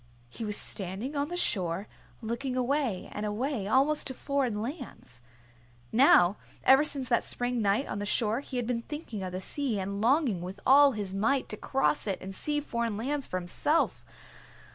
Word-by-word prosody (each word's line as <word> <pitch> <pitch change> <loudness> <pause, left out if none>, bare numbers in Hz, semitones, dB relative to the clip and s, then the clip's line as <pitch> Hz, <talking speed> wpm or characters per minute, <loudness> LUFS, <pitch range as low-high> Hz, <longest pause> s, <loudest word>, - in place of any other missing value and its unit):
He 230 - -6
was 210 -1 -1
standing 200 +9 -2
on 285 0 0
the 350 +2 -4
shore, 190 - 0 0.4
looking 250 +3 -3
away 255 -6 0
and 210 - -5
away, 215 +1 -2
almost 275 +7 +2
to 260 - -4
foreign 270 -7 -1
lands. 220 - -7 0.7
Now 210 -7 +6 0.3
ever 270 +2 +7
since 275 -4 0
that 235 - +3
spring 245 -1 -2
night 205 +6 +2
on - - -4
the 205 - -3
shore 220 +1 +1
he 270 -2 -6
had 245 - -1
been 235 0 -1
thinking 265 -6 -6
of 185 -1 -4
the 185 - -4
sea 240 +2 -1
and 200 +1 -3
longing 245 - +2
with 185 +3 -7
all 280 +1 +7
his 205 -3 -4
might 230 +8 +1
to - - -4
cross 270 +1 0
it 195 - -1
and 190 +1 -7
see 295 +9 -1
foreign 235 -6 -2
lands 275 +5 -2
for 185 - -2
himself. 185 - 0
235 Hz, 185 wpm, -29 LUFS, 200-275 Hz, 0.7 s, ever